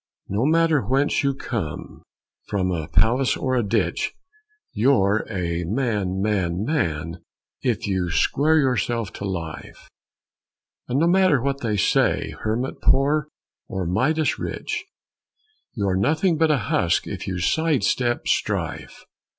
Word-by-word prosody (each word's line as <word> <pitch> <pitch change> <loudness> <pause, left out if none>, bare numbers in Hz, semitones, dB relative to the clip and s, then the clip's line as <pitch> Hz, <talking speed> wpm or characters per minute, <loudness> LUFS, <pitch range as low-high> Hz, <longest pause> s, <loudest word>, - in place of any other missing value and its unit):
No 110 +8 +1
matter 160 -2 +3
whence 135 +4 +1
you 140 -1 +1
came, 110 - -5 0.5
from 95 -2 0
a 80 -4 -3
palace 120 +10 +2
or 130 -1 -1
a 125 - +2
ditch, 100 -5 -1 0.6
You're 110 -3 +2
a 85 -2 -2
man, 105 -3 -1
man, 95 -3 0
man, 85 - -2 0.4
if 120 -3 -1
you 95 -3 -1
square 150 - +2
yourself 120 - 0
to 100 - -6
life; 85 -5 -6 1.0
And 125 - -1
no 160 - +3
matter 185 -5 +4
what 140 +2 -2
they 110 -3 -1
say, 95 - +2
hermit 115 +5 -3
poor 145 +2 +3 0.4
or 95 -1 -3
Midas 145 - +1
rich, - - -4 0.9
You 100 -4 -1
are 95 - +1
nothing 160 - +2
but 160 0 +2
a 150 - +3
husk 85 -6 +1
if 95 -1 -6
you 95 -1 -2
sidestep 125 - +1
strife. - - -2
115 Hz, 135 wpm, -23 LUFS, 95-140 Hz, 1.0 s, matter